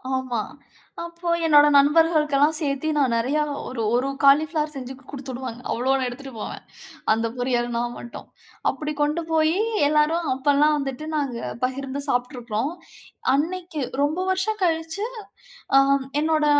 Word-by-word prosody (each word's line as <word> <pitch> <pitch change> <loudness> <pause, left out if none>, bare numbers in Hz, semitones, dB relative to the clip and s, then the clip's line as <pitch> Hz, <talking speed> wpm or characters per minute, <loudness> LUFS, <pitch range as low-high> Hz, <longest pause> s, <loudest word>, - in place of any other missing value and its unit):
ஆமா. 255 -3 -2 0.6
அப்போ 340 +1 -8 0.2
என்னோட 295 -2 +7
நண்பர்களுக்கு 300 +1 +4
எல்லாம் 295 +3 +4
சேர்த்து 280 -1 -2
நான் 265 -5 +2
நிறைய 255 +6 0 0.3
ஒரு 255 -3 -4
ஒரு 255 +3 +1
காளிபிளவர் 300 +2 +4
செஞ்சு 260 -2 -6 0.2
குடுத்து 275 -2 -6
விடுவாங்க. 250 -2 -6
அவ்வளவு 265 +2 +1
எடுத்துட்டு 265 +2 -8
போவேன். - - -6 0.5
அந்த 225 +1 +1
பொரியல் 245 -1 0
நான் 240 0 -2
மட்டும். 240 - -9 0.4
அப்படி 305 0 -4
கொண்டு 300 +3 +1
போய் 320 +1 +3 0.3
எல்லாரும் 305 +2 +2
அப்பெல்லாம் 290 +3 +3
வந்துட்டு 275 +1 -4
நாங்க 270 -5 -2 0.2
பகிர்ந்து 270 +2 -3
சாப்பிட்டு 250 +1 0
இருக்கோம். 235 +3 -2 0.6
அன்னைக்கு 340 +2 -2 0.2
ரொம்ப 300 +4 0
வருஷம் 385 +3 0
கழிச்சு 325 +3 0 0.7
அ - - +9 0.4
என்னோட 310 -1 +2
285 Hz, 135 wpm, -23 LUFS, 255-315 Hz, 0.7 s, அ